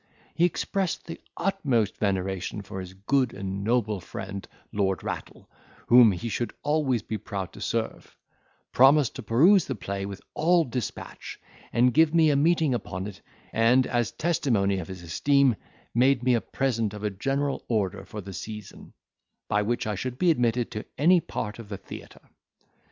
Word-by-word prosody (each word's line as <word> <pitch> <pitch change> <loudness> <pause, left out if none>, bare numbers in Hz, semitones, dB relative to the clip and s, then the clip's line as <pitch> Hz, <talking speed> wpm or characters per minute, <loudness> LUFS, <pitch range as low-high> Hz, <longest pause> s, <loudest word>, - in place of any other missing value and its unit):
He 170 - +3
expressed 185 0 -1
the 165 - -8 0.2
utmost 140 - 0
veneration 95 0 -2
for 95 0 -7
his 95 0 -8
good 125 +6 0
and 95 0 -4
noble 110 -2 +1
friend, 95 +3 -7 0.2
Lord 95 -2 0
Rattle, - - -6 0.4
whom 120 -2 +8
he 100 +5 -4
should 120 +1 -3
always 145 -7 +1
be 110 -1 -4
proud 95 -1 -5
to - - -11
serve; 115 -1 -3 0.5
promised 135 +1 +5
to - - -5
peruse 165 - +5
the 135 - -3
play 100 -1 -4
with 100 -1 -7
all 170 +2 +3
dispatch, 125 -5 -6 0.3
and 125 +1 +3
give 160 +3 +4
me 160 -2 +5
a - - +2
meeting 160 -1 +3
upon 95 -6 -4
it: 105 -2 -8 0.3
and, 120 +3 +4
as 120 -2 0
a - - -20
testimony 115 - +1
of 80 - -6
his 95 -2 -8
esteem, 135 - +3 0.4
made 125 +1 +3
me 125 0 +3
a 115 - +2
present 115 -6 -1
of 105 - -8
a 105 - 0
general 135 +7 -1
order 100 -4 -1
for 105 +2 -7
the 95 0 -9
season, 105 +1 -8 0.5
by 105 - +2
which 120 +3 -1
I 105 - -1
should 125 +6 -4
be 175 +2 +4
admitted 120 -4 +1
to 105 -2 -5
any 175 +5 +5
part 110 -6 -5
of 110 -3 -10
the 100 - -5
theatre. - - -12
115 Hz, 175 wpm, -26 LUFS, 100-140 Hz, 0.5 s, whom